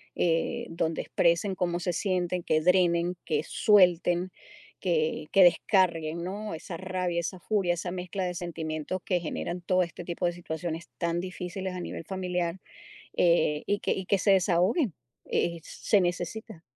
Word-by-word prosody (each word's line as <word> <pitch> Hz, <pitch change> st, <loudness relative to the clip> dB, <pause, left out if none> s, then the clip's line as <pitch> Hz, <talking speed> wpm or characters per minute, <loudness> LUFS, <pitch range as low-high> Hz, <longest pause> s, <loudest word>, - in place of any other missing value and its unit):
eh, 165 Hz, -1 st, 0 dB
donde 165 Hz, -1 st, -1 dB
expresen 170 Hz, +3 st, +1 dB
cómo 175 Hz, -2 st, -1 dB
se 180 Hz, 0 st, -1 dB
sienten, 180 Hz, -1 st, -1 dB
que 155 Hz, -1 st, +2 dB
drenen, 175 Hz, 0 st, +3 dB
que 155 Hz, -2 st, +1 dB
suelten, 180 Hz, -2 st, +3 dB, 0.5 s
que 160 Hz, -3 st, 0 dB
que 195 Hz, -, +7 dB
descarguen, 170 Hz, -2 st, +3 dB
¿no? 205 Hz, +3 st, -4 dB
Esa 165 Hz, +1 st, -7 dB
rabia, 185 Hz, -2 st, -2 dB
esa 180 Hz, +2 st, -5 dB
furia, 190 Hz, -2 st, +1 dB
esa 175 Hz, +1 st, -4 dB
mezcla 185 Hz, +1 st, -4 dB
de 180 Hz, -1 st, -3 dB
sentimientos 165 Hz, 0 st, -4 dB
que 180 Hz, -, +1 dB
generan 170 Hz, +2 st, -4 dB
todo 185 Hz, +1 st, +2 dB
este 170 Hz, 0 st, -7 dB
tipo 175 Hz, +1 st, -2 dB
de 175 Hz, -, -1 dB
situaciones 170 Hz, 0 st, -5 dB
tan 170 Hz, 0 st, 0 dB
difíciles 185 Hz, +1 st, -5 dB
a 180 Hz, -, -5 dB
nivel 165 Hz, -, -6 dB
familiar, 180 Hz, -2 st, -2 dB, 0.6 s
eh, 170 Hz, -3 st, +3 dB
y 205 Hz, 0 st, +1 dB
que -, -, -1 dB
y 190 Hz, -, -4 dB
que 200 Hz, 0 st, +2 dB
se 200 Hz, -, +3 dB
desahoguen, 190 Hz, -, +2 dB, 0.3 s
eh, 170 Hz, -1 st, 0 dB
se 205 Hz, -, +1 dB
necesita. 180 Hz, +2 st, -3 dB
175 Hz, 160 wpm, -28 LUFS, 170-185 Hz, 0.6 s, que